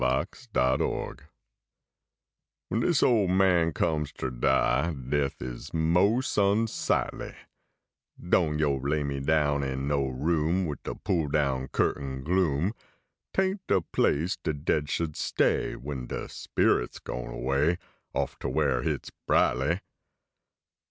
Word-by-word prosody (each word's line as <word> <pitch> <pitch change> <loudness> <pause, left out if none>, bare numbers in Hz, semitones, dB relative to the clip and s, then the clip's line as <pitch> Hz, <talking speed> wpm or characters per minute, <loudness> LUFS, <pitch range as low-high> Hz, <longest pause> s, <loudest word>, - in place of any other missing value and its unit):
GRAVE 65 +1 -1
MATTERS 65 +1 +1 1.5
Wen 110 - +1
dis 165 +4 +2
ole 110 -6 +4
man 90 -3 +3
comes 75 -2 0
ter 65 -2 -4
die, 70 +5 +2
Death 70 +1 -2
is 60 +4 -7
mos 95 +10 +2
unsightly; 105 +3 0 0.8
Doan 85 -3 +2
yo 75 -3 +2
lay 70 +3 0
me 70 -1 -2
in 70 -2 +1
no 70 -2 +1
room 80 +7 0
Wid 75 -3 -4
de - - -5
pull 80 -4 0
down 70 -3 0
curtain 65 -2 -1
gloom; 85 +1 +1 0.6
Tain 190 +1 +1
t 190 - -32
de - - +4
place 80 +1 +1
de 80 - -2
dead 75 0 -1
should 80 -1 -1
stay - - +1
Wen 65 -2 -6
de - - -4
spirit - - 0
s - - -6
gone - - -6
away, 70 +8 +1 0.4
Off - - -2
ter - - -3
where 70 -5 +1
hit - - -2
s - - -9 0.2
brightly. 75 +9 +2
75 Hz, 130 wpm, -28 LUFS, 70-85 Hz, 1.5 s, ole